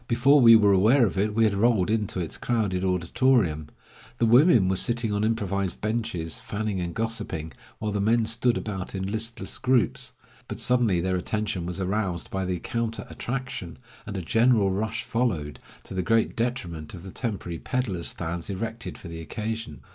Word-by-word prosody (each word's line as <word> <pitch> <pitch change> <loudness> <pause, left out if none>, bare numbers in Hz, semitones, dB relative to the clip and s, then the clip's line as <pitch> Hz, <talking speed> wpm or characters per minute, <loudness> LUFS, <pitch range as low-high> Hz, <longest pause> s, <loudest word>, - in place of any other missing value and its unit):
Before 135 +5 +5
we 115 -1 +9
were 105 -2 +5
aware 115 +7 +5
of 100 - -2
it 105 +1 0
we 115 - +4
had 110 -2 +3
rolled 105 -2 +2
into 105 -4 -1
its 85 -3 -3
crowded 105 -6 -1
auditorium. 90 - +1 0.5
The 120 - +2
women 120 - +6
were 95 - +1
sitting 115 +2 +1
on 105 +1 0
improvised 100 -4 -1
benches, 105 -8 -2
fanning 105 -2 -3
and 85 -1 -4
gossiping, 110 -8 -3 0.3
while 110 -1 -3
the 100 -1 -1
men 115 +2 +3
stood 115 +2 +1
about 95 -3 -5
in 95 0 -2
listless 115 +1 -3
groups. 130 -3 +1 0.3
But - - -6
suddenly 120 -8 +2
their 95 +1 0
attention 100 -2 -2
was 90 +2 -4
aroused 95 -2 -2
by 95 -1 -2
the 90 0 -1
counter 115 +4 -3
attraction, 125 - -5 0.3
and 100 -2 -4
a 95 - -4
general 115 +1 +3
rush 110 +3 -2
followed, 90 -12 -1 0.2
to - - -10
the 95 - -1
great 115 +3 +1
detriment 90 -11 -3
of 85 - -10
the 95 - -8
temporary 95 -9 -4
peddlers' 120 -10 -2
stands 85 +2 -4
erected 110 +4 -4
for - - -11
the 85 -1 -7
occasion. 110 - -5
105 Hz, 175 wpm, -26 LUFS, 90-115 Hz, 0.5 s, we